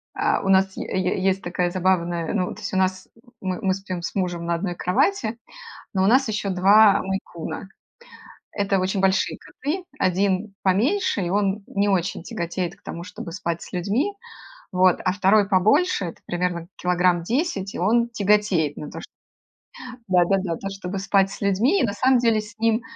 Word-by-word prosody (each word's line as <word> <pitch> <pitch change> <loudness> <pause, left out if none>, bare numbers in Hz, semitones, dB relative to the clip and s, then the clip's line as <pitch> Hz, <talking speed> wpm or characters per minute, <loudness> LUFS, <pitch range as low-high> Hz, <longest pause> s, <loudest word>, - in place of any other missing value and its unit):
а, - - +1
у 195 - -1
нас 190 0 +3
е - - -3 0.2
е 185 +1 -1
есть 195 0 +1
такая 175 0 -1
забавная 175 -3 0
ну, 185 -4 -1
то - - -12
есть - - -5
у - - +1
нас, 185 0 0 0.3
мы 185 -1 -3
мы 190 -1 +1
спим 185 -2 -5
с 170 - -5
мужем 175 -3 -2
на 170 - 0
одной 175 +1 -3
кровати, 220 - 0 0.6
но 190 - +2
у - - +4
нас 255 +2 +4
еще 210 -2 -2
2 180 -1 -4 0.4
два - - -3
мейн-куна. 190 -1 -5 0.8
Это 200 -1 0
очень 190 +1 -1
большие 190 0 +1
коты. 315 +7 -5 0.2
1 195 +1 +1
поменьше, 230 - +1
и 175 - -2
он 200 +1 0
не 200 0 0
очень 180 -3 0
тяготеет 175 +1 -4
к - - -31
тому, 170 - -6
чтобы 175 -2 -8
спать 170 -2 -3
с - - -10
людьми, 210 - 0 0.6
вот. 185 -1 +3
А 185 - +2
2 205 +1 +3
побольше, 200 - +3
это 170 - -8
примерно 175 -1 -2
килограмм 180 -1 +2
10, 220 - -1
и - - -4
он 235 +6 +2
тяготеет 205 -8 +1
на 150 - -7
то, - - -7
что - - -12 1.0
да-да-да, 185 0 +2
на - - -5
то, 195 - -5
чтобы 195 0 -5
спать 195 0 +2
с - - -9
людьми. 215 - +2
И - - +2
на 200 - -2
самом 255 +4 +3
деле 230 -2 +2
с 210 +1 -12
ним, 225 +1 +2
190 Hz, 190 wpm, -23 LUFS, 180-210 Hz, 1.0 s, у